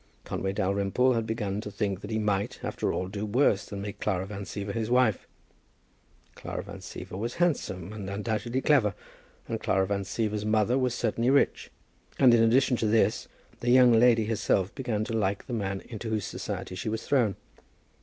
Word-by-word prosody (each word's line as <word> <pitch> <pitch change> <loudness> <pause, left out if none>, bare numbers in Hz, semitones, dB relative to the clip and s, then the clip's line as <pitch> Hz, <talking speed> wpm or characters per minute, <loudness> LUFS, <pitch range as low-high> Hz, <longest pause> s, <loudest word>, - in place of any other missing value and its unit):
Conway 95 - -3
Dalrymple 100 +5 +1
had 115 -2 -1
begun 105 -2 -2
to 105 - -6
think 100 -2 -2
that 105 - -7
he 110 - -1
might, 105 -2 -1
after - - -1
all, 90 - -2
do 100 +2 -5
worse 110 -1 +2
than 100 -1 -6
make 105 0 -6
Clara 95 0 -1
Van 100 0 -6
Siever 100 +1 -5
his 110 0 -2
wife. 125 -4 +2 1.1
Clara - - -6
Van - - -9
Siever - - -8
was 115 +5 -3
handsome, 105 - -1
and 100 -3 -6
undoubtedly 110 +5 -2
clever, 125 -11 +3 0.5
and - - -3
Clara 95 0 +1
Van 100 +1 -1
Siever's 105 +1 -2
mother 110 +2 +2
was 130 -2 +1
certainly 115 +1 0
rich. 140 +1 +2 0.5
And, 125 -3 +6
in 115 - +5
addition 125 +2 +4
to 110 - 0
this, 110 +1 +2 0.3
the 120 - -2
young 125 0 +7
lady 115 -1 +5
herself 105 -2 0
began 120 -6 -2
to 115 - -4
like 100 -3 0
the 125 - -6
man 100 -3 -2
into 115 -1 -7
whose 110 -2 -1
society 100 - -5
she 95 +5 -4
was 110 +1 -3
thrown. 120 -9 +2
110 Hz, 185 wpm, -28 LUFS, 100-120 Hz, 1.1 s, young